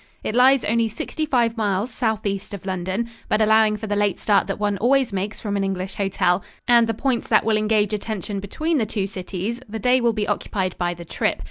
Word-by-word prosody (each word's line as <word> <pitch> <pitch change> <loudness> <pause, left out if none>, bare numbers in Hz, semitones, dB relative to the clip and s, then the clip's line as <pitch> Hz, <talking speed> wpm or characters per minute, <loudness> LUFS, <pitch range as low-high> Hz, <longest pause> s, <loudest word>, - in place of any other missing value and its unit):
It - - -2
lies 255 +1 +5
only 230 +1 +1
sixty 305 +8 -4
five 235 -4 +1
miles 205 +2 0
southeast 210 -4 -2
of 195 - -11
London, 190 +4 -2 0.2
but 215 - +2
allowing 220 0 +4
for 220 - -6
the 205 -1 -1
late 205 -1 +1
start 205 -2 +2
that 195 - -3
one 205 -2 -1
always 255 0 +2
makes 195 +2 -3
from 205 -2 -3
an 200 - 0
English 190 0 -3
hotel, 195 -2 +1 0.2
and 235 -1 +5
the 225 - -1
points 255 0 -1
that - - +3
will 220 -1 +3
engage 215 -1 +1
attention 205 -1 -3
between 310 - -1
the 220 - 0
two 200 -2 -2
cities, 195 +4 -5
the 225 - -4
day 250 +4 +3
will 235 -1 +3
be 210 -1 -2
occupied 190 -2 -2
by 175 -1 -1
the 170 0 -10
trip. - - -1
210 Hz, 220 wpm, -22 LUFS, 195-230 Hz, 0.2 s, lies